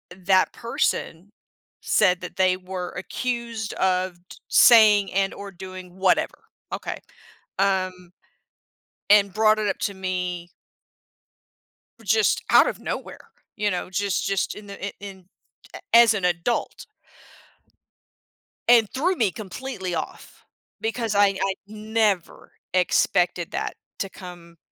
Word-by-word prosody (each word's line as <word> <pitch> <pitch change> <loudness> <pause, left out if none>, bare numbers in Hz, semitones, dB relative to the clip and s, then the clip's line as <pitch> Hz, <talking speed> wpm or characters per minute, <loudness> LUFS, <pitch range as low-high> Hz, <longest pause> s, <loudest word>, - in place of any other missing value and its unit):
that 185 0 +2
person 205 -5 -2 0.5
said 180 0 +2
that 180 - -8
they 185 -1 +3
were 185 -1 -6
accused 235 +2 -4
of 185 -1 0
d - - -12
saying 210 -4 +6
and/or 195 +1 -1
doing 185 0 -10
whatever, 190 -1 0 0.2
okay, - - -5 0.6
um, 185 -2 0 1.0
and 200 -2 +5
brought 215 0 +3
it 210 - -1
up - - -1
to 200 - -2
me 180 -2 -4 1.6
just 220 +1 +2
out - - +6
of - - -3
nowhere, - - -6 0.3
you 210 -1 +1
know? 180 0 -3
Just 200 0 -1
just 195 -1 -1
in 210 -1 -11
the 200 0 -7
i - - -7
in 195 -2 -10 0.5
a - - -8
as 230 -1 +8
an 195 -4 -2
adult. 175 +6 -1 1.8
And 230 -3 +6
threw 350 +8 +1
me 215 - +1
completely 195 -3 -6
off 160 - -7 0.3
because 225 -1 -2
I 200 0 +5
I 195 - 0
never 215 -3 -1 0.2
expected 180 -1 +2
that - - -3 0.2
to 195 - -3
come 175 -3 -12
195 Hz, 120 wpm, -24 LUFS, 180-215 Hz, 1.8 s, as